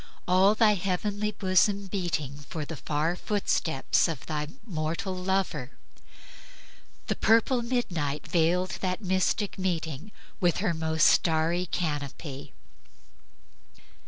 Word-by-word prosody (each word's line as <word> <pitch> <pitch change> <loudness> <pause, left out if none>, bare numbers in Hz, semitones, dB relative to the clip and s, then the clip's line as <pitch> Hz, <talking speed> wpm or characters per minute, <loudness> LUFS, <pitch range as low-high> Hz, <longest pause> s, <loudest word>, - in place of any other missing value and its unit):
all 190 +3 +5
thy 215 -1 +5
heavenly 200 +2 -1
bosom 195 0 +2
beating 175 -8 -2
For 155 -2 -4
the 160 - -6
far 150 +6 -1
footsteps 180 -8 +1
of 160 -6 -5
thy 150 -1 -3 0.2
mortal 170 0 -3
lover; 180 -7 -1 1.3
The - - -1
purple 230 +3 +3
midnight 175 - -2
veiled 175 +2 +1
that 185 +2 -2
mystic 190 +2 0
meeting 170 -1 -3 0.3
With 175 -3 +2
her 190 -3 0
most 160 -1 +1
starry 165 +2 +3
canopy;" 145 -4 -4 1.3
etc. - - -26
180 Hz, 110 wpm, -28 LUFS, 155-195 Hz, 1.3 s, all